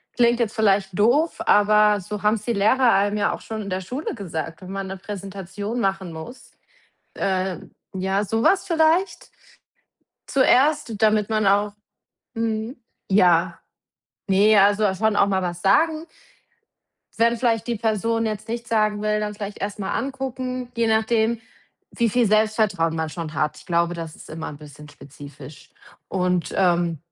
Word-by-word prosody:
Klingt 240 0 +3
jetzt 230 -1 -1
vielleicht 195 -3 +1
doof, 260 +10 +3
aber 210 -6 +4
so 210 +3 -7
haben's 210 0 +1
die 235 - 0
Lehrer 230 +5 +3
einem 205 +1 +1
ja 205 - +1
auch - - -7
schon 220 -1 -6
in 200 - -7
der 185 +1 -2
Schule 255 - -5
gesagt, 165 -5 -6
wenn 185 0 -9
man 195 0 -4
'ne 195 +1 -6
Präsentation 200 +3 -6
machen 190 -4 -2
muss. 160 +11 -10 0.6
Äh, 190 -1 -1 0.4
ja, 190 +2 -1
so 225 +3 -1
was 385 +8 +3
vielleicht? 335 +2 +1 1.0
Zuerst, 265 -2 +3
damit 215 0 +3
man 215 -1 +1
auch 205 +1 +2 0.6
mhm, 225 +2 -2 0.3
ja, 175 -3 +3 0.7
ne, 205 +3 +4
also 205 +2 +4
dass 190 -2 0
schon 220 -1 +1
auch - - +4
mal 190 -2 0
was 175 -1 -4
sagen. 315 +11 +2 1.1
Wenn 235 +1 +3
vielleicht 230 -2 0
die 235 - -1
Person 225 +1 0
jetzt 215 0 -5
nichts 235 +1 -5
sagen 215 -2 +1
will, 210 0 0
dann 210 0 -3
vielleicht 205 0 -7
erst 200 +1 -4
mal 195 -2 -3
angucken, 255 -1 -4
je 230 0 +1
nachdem, 220 +1 +1 0.5
wie 235 -2 0
viel 245 +2 +2
Selbstvertrauen 215 -6 +1
man 160 -1 -2
schon 160 -1 -6
hat. 150 0 -1
Ich - - -14
glaube, 170 0 +1
das 165 -2 -7
ist - - -14
immer 160 +1 -6
'n 145 - -9
bisschen 150 0 -13
spezifisch. 145 0 -13 0.4
Und, 180 -2 -1
ähm, 175 -3 +1
210 Hz, 160 wpm, -22 LUFS, 185-230 Hz, 1.1 s, aber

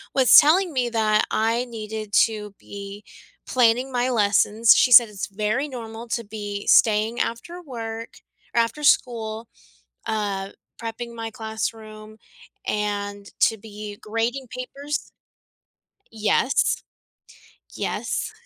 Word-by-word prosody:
was 260 -2 +6
telling 340 +4 +5
me 250 -2 0
that 215 -2 +2
I 230 +3 +1
needed 220 -2 -7
to 210 -2 -7
be 200 +1 -9 0.4
planning 250 +1 +2
my 250 0 0
lessons. 215 0 +4
She 250 - +3
said 235 -2 +9
it's 200 -3 -5
very 215 +7 -1
normal 230 -3 -8
to 235 - -2
be 205 -1 -6
staying 220 +2 +4
after 345 +10 -3
work 230 -6 -7 0.3
or 235 - +4
after 230 +6 -3
school, 225 -5 +1 0.6
uh, 200 -3 -2 0.3
prepping 235 +1 -6
my 225 0 -5
classroom, 220 -1 -6 0.5
and 205 -1 -3
to 225 - +4
be 210 -1 -9
grading 230 +5 -2
papers. 280 +4 -5 1.0
Yes. 225 +4 +1 0.9
Yes, - - -3
225 Hz, 115 wpm, -23 LUFS, 210-245 Hz, 1.0 s, said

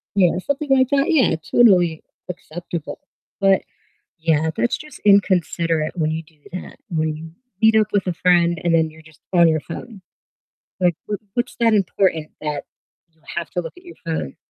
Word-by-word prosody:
You 180 -4 +5
know, - - -2
something 285 +6 -3
like 260 -1 +3
that, 280 +5 +2
yeah, 260 - +4 0.2
totally 180 -9 +4 0.3
acceptable. 175 - -6 0.4
But 195 -1 +4 0.6
yeah, 160 -1 +1
that's 240 - 0
just 305 0 -12
inconsiderate 170 -5 +2
when 155 -3 0
you 160 +1 -3
do 155 -1 -26
that, 185 - -7
when 155 -2 -1
you 160 +1 -9 0.3
meet 220 0 +5
up 215 - +2
with 200 -2 0
a 180 - 0
friend 170 -1 +3
and 170 -1 +2
then 160 -1 +3
you're 160 +1 -16
just 160 -1 -20
on 170 -1 +6
your 155 -1 +2
phone. 195 +6 -9 0.8
Like, 175 -3 +2
wh 205 - 0 0.2
what's 240 0 -2
that 230 -1 +4
important 185 -5 +1
that 150 -2 -3 0.5
you 160 -1 -35
have 170 -3 -3
to 180 - -1
look - - -8
at 360 - -17
your 350 - -12
phone? 160 - -3
175 Hz, 180 wpm, -21 LUFS, 160-205 Hz, 0.8 s, on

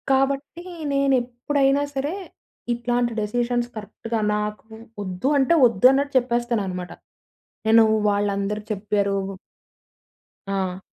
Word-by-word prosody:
కాబట్టి, 275 +5 0 0.3
నేనేప్పుడైనా 275 +1 +1
సరే 280 +4 -1 0.6
ఇట్లాంటి 240 0 0
డెసిషన్స్ 240 +3 -1
కరెక్ట్‌గా 225 +1 -4 0.2
నాకు 210 0 -3 0.4
వొద్దు 185 +4 -3
అంటే, 275 +4 +3
వొద్దు 230 -3 +2
అన్నట్టు 280 +1 0
చెప్పేస్తానన్నమాట. 235 -7 -2 0.8
నేను 225 +1 +7 0.3
వాళ్ళందరు 205 0 -1
చెప్పారు 200 -1 0 1.3
ఆ! 190 -1 -2
235 Hz, 90 wpm, -23 LUFS, 205-270 Hz, 1.3 s, నేను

